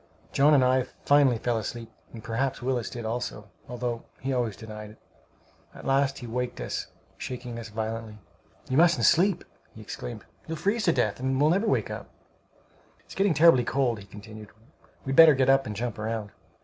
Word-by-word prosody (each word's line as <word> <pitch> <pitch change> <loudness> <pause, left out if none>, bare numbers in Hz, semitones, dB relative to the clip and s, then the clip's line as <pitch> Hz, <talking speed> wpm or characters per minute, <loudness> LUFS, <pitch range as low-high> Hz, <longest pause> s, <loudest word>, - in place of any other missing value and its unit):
John 145 +2 +5
and 130 -2 +4
I 130 +1 +3 0.2
finally 140 -4 +5
fell 115 0 -1
asleep, 115 +1 -6 0.2
and 115 - -10
perhaps 125 +3 -2
Willis 125 -2 -2
did 120 -2 -7
also, 110 -3 -4 0.2
although 120 -1 -3 0.2
he 135 +1 -2
always 120 -5 -1
denied 105 -1 -9
it. 105 - -15 0.8
At - - -11
last 135 0 +2
he 120 - -8
waked 125 +1 -3
us, - - -4 0.3
shaking 125 -2 -6
us 115 -1 -8
violently. 110 0 -5 0.5
"You 130 - 0
mustn't 165 -7 +4
sleep!" 185 +2 +3 0.3
he - - -11
exclaimed. 60 -1 -7 0.2
"You'll 160 0 -4
freeze 205 +7 0
to 170 - +5
death 120 -8 0
and 130 +1 0
never 170 +10 +3
wake - - 0
up!" - - -7 0.9
"It's - - -14
getting 195 -4 +2
terribly 150 -5 +6
cold," 120 -1 0
he 100 - -11
continued; 105 +1 -11 0.6
"we'd 135 0 -1
better 160 -2 +9
get 130 0 +4
up 135 -1 +3
and 105 - -5
jump 120 +1 -4
round." 110 -1 -3
125 Hz, 180 wpm, -27 LUFS, 110-135 Hz, 0.9 s, better